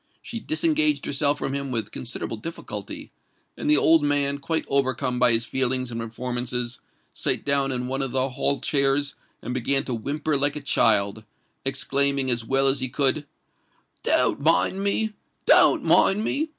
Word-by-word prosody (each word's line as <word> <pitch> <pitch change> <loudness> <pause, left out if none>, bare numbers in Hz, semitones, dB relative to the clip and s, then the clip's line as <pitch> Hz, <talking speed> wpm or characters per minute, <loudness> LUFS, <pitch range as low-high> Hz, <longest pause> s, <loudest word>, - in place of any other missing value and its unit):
She 230 - -6
disengaged 315 +2 +1
herself 145 +1 +1
from 135 - -4
him 140 -1 -4
with 110 -4 -3
considerable 115 -2 -5
difficulty; 165 +10 -7 0.4
and 295 - -4
the 300 - +6
old 165 -1 +5
man, 145 -1 0
quite 160 +3 -2
overcome 130 -2 0
by 125 -1 +4
his 115 0 +3
feelings 130 0 0
and 115 0 -4
performances, 120 +1 -4 0.3
sate - - -2
down 140 -1 +1
in 125 -1 -2
one 135 +1 -3
of 135 - -2
the 130 +2 -1
hall 135 +2 -1
chairs, 140 0 0 0.3
and 120 - -4
began 135 +2 +1
to 130 - -4
whimper 145 +6 -2
like 145 +1 +1
a 150 - -5
child—exclaiming 130 +5 0
as 120 -1 +2
well 135 +4 +1
as 135 0 +4
he 130 -1 -1
could, 145 +3 +1 0.7
"Don't - - +1
mind 165 +5 +2
me—don't 215 +1 +2
mind 205 +2 +4
me! 310 +7 -1
135 Hz, 160 wpm, -24 LUFS, 125-145 Hz, 0.7 s, the